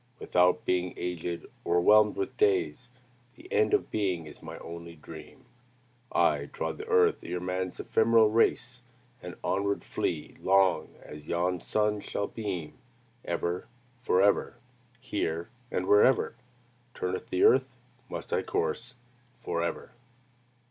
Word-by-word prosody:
Without 90 -4 +2
being 90 0 0
aged, 90 -1 -4 0.2
o'erwhelmed 105 +5 +5
with 95 - -3
days, 95 +3 +1 0.5
The 365 - -14
end 440 -2 +3
of 415 - -2
being 95 -6 -1
is 75 - -12
my - - -8
only 85 0 -9
dream. 80 0 -12 0.7
I - - +2
trod - - -4
the 430 - -7
earth 450 -2 +4
ere 90 - -4
man's 90 0 -3
ephemeral 110 0 +4
race, 120 +2 +1 0.4
And 90 0 -8
onward 100 +1 0
flee 80 -3 -3
long 95 -1 +3
as 75 0 -11
yon 90 +1 0
sun 105 +3 0
shall 100 0 -3
beam, 95 -9 -5 0.5
Ever, 85 +1 -2 0.3
forever, 100 -4 +2 0.4
Here, 85 -9 -3 0.2
and 90 - -2
wherever, 105 +7 +4 0.6
Turneth 90 0 -3
the 365 - +1
earth, 435 +1 +4 0.3
must - - -6
I - - +2
course 425 - -2 0.4
forever!" 85 0 -3
95 Hz, 125 wpm, -29 LUFS, 85-110 Hz, 0.7 s, o'erwhelmed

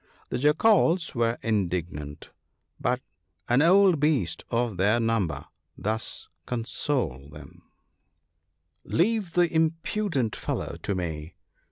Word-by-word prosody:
The 125 - -2
Jackals 165 - +3
were 115 -1 +1
indignant, 85 -9 -2 0.5
but 125 +1 0 0.5
an 120 +3 +4
old 185 0 +5
beast 135 - +1
of 115 -4 0
their 105 +5 +3
number 100 -11 0 0.3
thus 110 +2 -3 0.2
consoled 115 - -2
them: 75 -2 -13 0.4
— - - -50
* - - -50
Leave 200 -1 0
the 175 -2 +2
impudent 160 - 0
fellow - - -4
to 100 - -2
me. 80 -3 -4
120 Hz, 115 wpm, -26 LUFS, -, 0.5 s, old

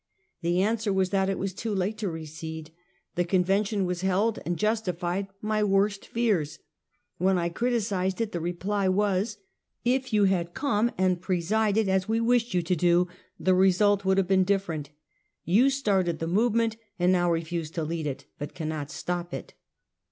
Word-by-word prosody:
The 175 +2 +2
answer 220 0 0
was 190 -1 +1
that 195 -1 +2
it 195 - -1
was 195 -1 -3
too 215 +2 -3
late 195 +3 0
to 205 -4 -1
recede. 160 0 -7 0.4
The 175 - +1
convention 195 +3 +1
was 180 0 -2
held, 195 +4 +1
and 175 0 -1
justified 195 -2 -1 0.2
my 215 0 +1
worst 195 0 +1
fears. 205 -11 0 0.6
When 190 +1 +3
I 170 -1 0
criticised 200 -3 -1
it, 225 -2 -1
the 175 - -3
reply 185 +4 -1
was: 205 +2 +1 0.2
" - - -50
If 260 -1 -4
you 210 -1 +3
had 175 -3 +1
come 235 -5 +1
and 185 -1 +1
presided, 205 +4 +1
as 190 +1 +1
we 225 +1 +2
wished 235 -2 +2
you 175 - +2
to 180 +2 +1
do, 175 +1 +3 0.3
the 185 - +3
result 195 +2 +4
would 190 0 +2
have 195 -2 +2
been 190 0 +4
different. 180 -7 -1 0.6
You 225 +10 +4
started 195 -11 +1
the 165 - -3
movement 225 +5 +1 0.2
and 180 0 +3
now 175 -1 +3
refuse 165 -1 -2
to 165 0 -3
lead 160 0 -3
it, 135 -1 -5
but 145 - -6
cannot 155 -3 -4
stop 175 +1 -4
it." - - -8
190 Hz, 175 wpm, -27 LUFS, 175-210 Hz, 0.6 s, result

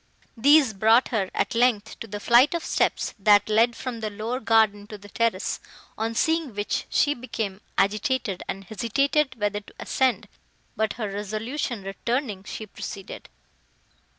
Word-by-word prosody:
These 275 0 +5
brought 220 +5 +4
her, 205 -6 -1
at 200 - 0
length, 230 -3 +1
to 225 - -7
the 205 0 -6
flight 245 +9 +5
of 335 - -3
steps, - - 0
that 205 0 +5
led 225 +2 +3
from 250 -3 -5
the 215 -1 -3
lower 220 +5 -4
garden 220 -3 +2
to 210 - -8
the 205 0 -14
terrace, 230 -3 -1 0.4
on 225 +1 -2
seeing 320 -4 0
which, 205 0 -2
she 290 - +2
became 220 -6 -5 0.2
agitated, 210 +1 0
and 195 - -5
hesitated 265 +7 0
whether 205 0 0
to 205 - -18
ascend, 260 -2 0 0.5
but, 220 -1 0
her 220 -3 -4
resolution 215 +4 -4
returning, 210 +1 -3
she 220 - -6
proceeded. 195 -1 -8
220 Hz, 150 wpm, -25 LUFS, 205-250 Hz, 0.5 s, These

